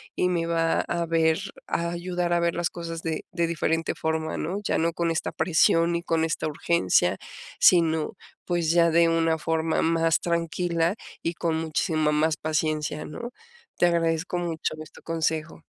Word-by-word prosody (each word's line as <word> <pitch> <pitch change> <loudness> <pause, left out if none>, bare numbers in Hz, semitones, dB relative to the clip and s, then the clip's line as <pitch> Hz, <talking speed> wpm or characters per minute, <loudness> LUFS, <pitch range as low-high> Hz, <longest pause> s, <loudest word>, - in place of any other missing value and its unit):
y 180 - +1
me 170 -2 0
va 165 -1 +1
a 170 0 -2
ver 160 -1 +2 0.3
a 170 0 -1
ayudar 175 0 -2
a 170 - +3
ver 170 0 0
las 175 0 -1
cosas 165 -1 -6
de 160 -1 -3
de 170 0 0
diferente 165 0 -1
forma, 160 0 -2
¿no?, 185 +4 -2
ya - - 0
no 165 +1 +1
con 170 -1 0
esta 160 - -2
presión 165 +1 +3
y 170 - -1
con 165 -2 0
esta 160 -1 -2
urgencia, 140 - +2 0.4
sino 160 -3 +4 0.3
pues, 175 -2 0
ya 170 0 +4
de 170 0 +4
una 165 -1 +1
forma 160 0 0
más 165 -1 +2
tranquila 170 0 0 0.3
y 165 - -1
con 165 -1 -1
muchísima 155 -1 0
más 155 +1 +1
paciencia, 155 -1 -1
¿no? 240 +10 -7 0.5
Te 175 - +4
agradezco 170 +1 0
mucho 165 -3 -2
este 155 - -12
consejo. 160 -1 -2
165 Hz, 165 wpm, -25 LUFS, 160-170 Hz, 0.5 s, sino